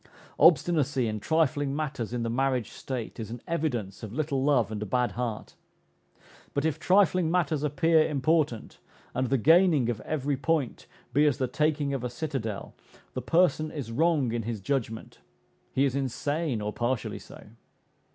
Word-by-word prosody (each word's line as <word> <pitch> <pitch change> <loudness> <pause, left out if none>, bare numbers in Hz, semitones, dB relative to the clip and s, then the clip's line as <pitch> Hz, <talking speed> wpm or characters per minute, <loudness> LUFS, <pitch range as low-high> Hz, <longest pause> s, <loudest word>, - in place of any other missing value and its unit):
Obstinacy 150 -5 +4
in 110 -1 -3
trifling 145 0 +1
matters 140 -7 -3
in 120 -1 -2
the 115 - -1
marriage 130 -2 0
state 125 -5 -6
is 110 - -5
an 120 +2 -6
evidence 125 - -2
of 110 -3 -7
little 140 0 -1
love 125 -7 +2
and 105 -1 -4
a - - -2
bad 125 0 +1
heart; 115 +1 -4 1.0
but 140 +1 0
if 160 - 0
trifling 185 -3 +3
matters 165 -4 +1
appear 155 +2 +3
important, 145 -4 0 0.3
and 130 -1 -1
the 135 - +3
gaining 155 - +4
of 110 -2 -6
every 145 0 -1
point 150 -3 -1 0.3
be 145 +3 +4
as 140 -4 +1
the 130 - 0
taking 145 +2 0
of 135 -3 -3
a 125 - -2
citadel, 120 -6 -4 0.4
the - - -3
person 165 -3 +2
is 135 -8 -6
wrong 150 -1 +2
in 120 0 -1
his 115 -1 -4
judgment; 115 0 -3 0.5
he 135 - +2
is 135 -1 0
insane, 140 0 -1
or 105 0 -3
partially 120 0 -2
so. - - -13
135 Hz, 165 wpm, -28 LUFS, 120-155 Hz, 1.0 s, Obstinacy